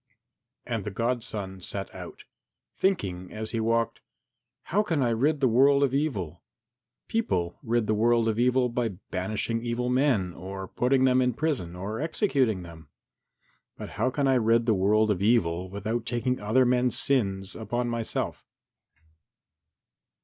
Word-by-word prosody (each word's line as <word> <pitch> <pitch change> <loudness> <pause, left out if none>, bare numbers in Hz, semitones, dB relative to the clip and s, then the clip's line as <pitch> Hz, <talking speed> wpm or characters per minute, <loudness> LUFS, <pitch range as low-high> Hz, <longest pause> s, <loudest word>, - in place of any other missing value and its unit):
VII 120 - -4
And 110 -3 -1
the 105 - -3
godson 105 -4 -3
set 100 +2 -6
out, - - -9 0.5
thinking 95 - -1
as 110 0 -5
he 115 - -1
walked, 115 0 0 0.6
"How 205 +4 +1
can 165 -10 0
I 120 - +2
rid 140 +6 +1
the 130 - +5
world 140 +4 +5
of 135 -2 +1
evil? 100 - -2 0.7
People 90 - -1
rid 120 -3 0
the 110 - +1
world 115 +1 +3
of 110 0 0
evil 125 +1 +3
by 120 -3 -2 0.2
banishing 110 +5 -2
evil 120 +1 -2
men 125 -9 +2
or 95 +2 -7
putting 130 +6 +1
them 130 0 +4
in 125 -2 +1
prison 125 - -2
or 100 +5 -4
executing 135 - +1
them. 80 -3 -12 0.9
But - - -7
how 115 +5 0
can 140 +1 0
I 135 - +4
rid 115 0 +3
the 115 - +3
world 105 +3 +3
of 95 -2 -1
evil 95 -5 +2
without 110 +5 -3
taking 125 +1 -1
other 110 +5 +3
men's 125 0 +2
sins 95 -8 0
upon 120 +2 -2
myself?" 115 -1 -3
115 Hz, 155 wpm, -27 LUFS, 100-125 Hz, 0.9 s, the